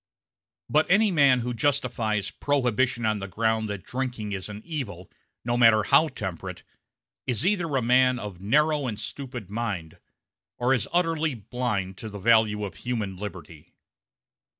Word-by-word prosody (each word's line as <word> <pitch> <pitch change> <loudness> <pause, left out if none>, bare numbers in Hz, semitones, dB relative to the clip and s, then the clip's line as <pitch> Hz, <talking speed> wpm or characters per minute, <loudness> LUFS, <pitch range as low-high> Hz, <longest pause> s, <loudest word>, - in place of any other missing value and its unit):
But 155 +1 +3
any 210 +3 +4
man 140 -6 +5
who 125 +1 -3
justifies 120 -6 0
Prohibition 125 -4 0
on 110 -1 +1
the 95 - -5
ground 110 +2 0
that 100 -3 -5
drinking 125 -3 -4
is 95 0 -4
an 105 +1 -8
evil, 105 - -6 0.3
no 120 0 +1
matter 115 -3 +6
how 160 +10 +5
temperate, 95 - -6 0.6
is 125 +4 +1
either 180 -7 +1
a 130 - +1
man 125 +1 +4
of 100 -6 -7
narrow 150 +6 +2
and 110 -3 -4
stupid 125 -5 -7
mind 105 -8 -4 0.6
or 125 +2 +2
is 125 -6 -1
utterly 165 -4 +1
blind 105 -4 -3
to 110 - -6
the 105 - -8
value 105 0 +3
of 100 - -8
human 110 -6 -3
liberty. 90 -6 -9
115 Hz, 150 wpm, -26 LUFS, 105-130 Hz, 0.6 s, matter